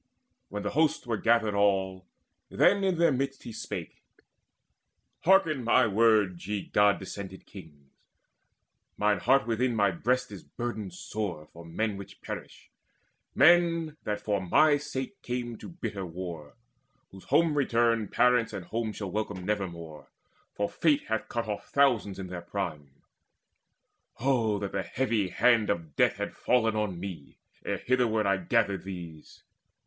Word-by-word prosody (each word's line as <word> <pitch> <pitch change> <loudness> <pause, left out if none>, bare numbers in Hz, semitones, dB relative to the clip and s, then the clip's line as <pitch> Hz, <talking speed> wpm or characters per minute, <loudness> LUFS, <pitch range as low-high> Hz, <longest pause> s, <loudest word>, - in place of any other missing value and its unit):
When 105 0 -5
the 105 - -2
host 155 -1 +1
Were 115 -2 -1
gathered 115 -1 +2
all, 95 -2 +1 0.4
then 200 0 +3
in 190 -3 +1
their 170 -1 +4
midst 135 +1 -2
he 115 - -8
spake: - - -6 1.2
"Hearken 165 -7 +4
my 120 +2 +4
words, 105 -4 +2
ye 105 -2 -2
god 105 -1 +3
descended 95 0 -8
kings: 75 -8 -14 1.1
Mine 105 -2 +2
heart 135 +8 +3
within 120 +1 0
my 100 -3 +3
breast 125 +7 -1
is 100 - -8
burdened 110 -6 -5
sore 95 -7 -4
For 85 - -11
men 100 +5 -2
which 100 - -11
perish, - - -8 0.6
men 170 -3 +4
that 105 -1 -2
for 100 -2 -1
my 145 - +4
sake 140 +5 -6
Came 120 -1 -4
to - - -9
the - - -11
bitter 105 - -5
war, 85 -4 -7 0.6
whose 95 -1 -13
home 165 -2 +3
return 115 -5 +2
Parents 125 -1 +2
and 95 -4 -6
home 110 +3 -3
shall 100 -3 -5
welcome 100 -3 -3
nevermore; 85 -7 -4 0.5
For 100 - 0
Fate 150 +3 +1
hath 110 0 -2
cut 115 -1 -2
off 105 -1 -5
thousands 125 -8 +2
in 95 - -5
their 90 -1 -6
prime. 85 -6 -5 1.3
Oh 115 -4 +1
that 100 -1 -4
the 100 - -1
heavy 115 -4 -1
hand 115 +3 +3
of 85 -7 -3
death - - +3
had - - -4
fallen 115 -3 +2
On 105 -5 -2
me, 90 -7 -8 0.3
ere - - -2
hitherward 120 -4 +1
I 100 0 +2
gathered 100 +1 0
these! 85 -5 -9
105 Hz, 150 wpm, -28 LUFS, 95-125 Hz, 1.3 s, their